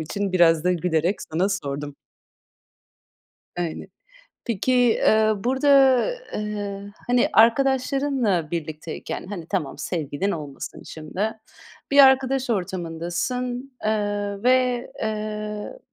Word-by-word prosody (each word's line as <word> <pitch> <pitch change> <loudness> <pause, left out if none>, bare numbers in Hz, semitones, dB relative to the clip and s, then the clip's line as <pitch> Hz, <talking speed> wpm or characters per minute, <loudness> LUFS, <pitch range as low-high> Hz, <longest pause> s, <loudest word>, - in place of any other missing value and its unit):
için 195 +5 -3
biraz 165 -2 +4
da 180 - +3
gülerek 170 +2 0
sana 180 +5 +2
sordum. 145 -6 -4 1.6
Aynı. 170 -2 -3 0.6
Peki, 235 +2 -1
eee, 220 -3 +4
burada, 265 +3 +1 0.7
ııı, 205 -1 -5
hani, 245 +4 +3
arkadaşlarınla 255 - +2
birlikteyken, 160 0 -5
hani, 180 -5 -7
tamam, 175 -8 -3
sevgilin 165 +3 -2
olmasın 145 -5 -6
şimdi, 185 +8 -4 0.6
bir 280 - +3
arkadaş 265 -1 +3
ortamındasın, 190 +8 -3
eee, 205 -1 -1
ve, 250 -1 +2
eee, 215 - -4
205 Hz, 95 wpm, -23 LUFS, 170-245 Hz, 1.6 s, biraz